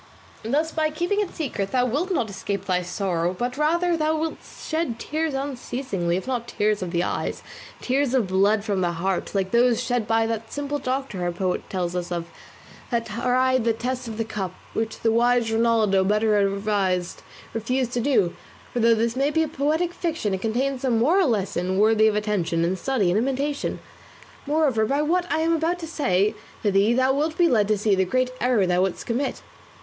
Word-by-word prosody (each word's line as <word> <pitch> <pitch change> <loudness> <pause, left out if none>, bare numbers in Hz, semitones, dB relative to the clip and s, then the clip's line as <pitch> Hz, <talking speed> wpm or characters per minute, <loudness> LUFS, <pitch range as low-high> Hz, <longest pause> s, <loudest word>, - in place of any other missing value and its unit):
Thus 295 +8 0
by 310 -1 0
keeping 345 +7 -1
it 410 -3 -2
secret 220 - -3
thou 250 -1 +2
wilt 290 - -1
not 245 -11 +1
escape 200 -1 -4
thy 180 -2 +1
sorrow, 180 -1 -1
but 245 +3 -2
rather 340 +4 +2
thou 315 0 +1
wilt 320 +1 -3
shed 315 -7 -3
tears 310 +3 -2
unceasingly, 250 -9 -2
if 190 - -5
not 245 -3 -2
tears 210 -2 0
of 180 - -3
the 170 0 0
eyes, - - -3 0.4
tears 265 0 +1
of 245 -5 +3
blood 200 +3 +2
from 200 -4 -1
the 175 -1 0
heart, 185 +4 -2
like 190 -1 0
those 235 0 +4
shed 245 -3 -1
by 225 0 +2
that 225 0 -4
simple 290 0 -3
doctor 260 -7 -3
our 175 0 0
poet 180 +1 -2
tells 180 -2 -2
us 180 0 -3
of, 170 -1 -2 0.6
that 235 -2 0
tried 250 +3 +1
the 230 0 +2
test 250 +2 -3
of 220 -1 -6
the 225 - -1
cup, 195 -5 -4 0.2
which 225 0 -3
the 225 - +2
wise 240 0 +2
Rinaldo, 225 -4 +3
better 210 +2 +2
advised, 195 -3 0 0.3
refused 245 +2 -1
to 245 - 0
do; 230 -9 +2 0.4
for 245 - -1
though 230 0 +5
this 230 +1 0
may 275 +2 +2
be 320 +1 +2
a - - -1
poetic 310 +4 0
fiction 320 - -2
it 190 - -2
contains 255 +5 -1
a 265 - +1
moral 285 +10 +3
lesson 190 -4 -1
worthy 220 +1 +5
of 215 - +2
attention 195 -6 0
and 185 +2 -1
study 230 -10 +1
and 195 - +2
imitation. 275 +4 -1 0.7
Moreover 290 -7 +2
by 285 +4 +1
what 350 +3 0
I 315 - +1
am 330 +1 +2
about 330 +2 0
to 335 -2 -7
say 205 - +1 0.3
to 205 - +2
thee 200 +4 +3
thou 260 +1 +3
wilt 310 +4 -1
be 345 - +5
led 215 -8 +3
to 215 0 +2
see 210 0 +2
the 190 0 +3
great 255 +7 0
error 245 -5 +3
thou 180 0 +2
wouldst 190 -1 -1
commit. 250 +4 -2
230 Hz, 200 wpm, -24 LUFS, 195-275 Hz, 0.7 s, though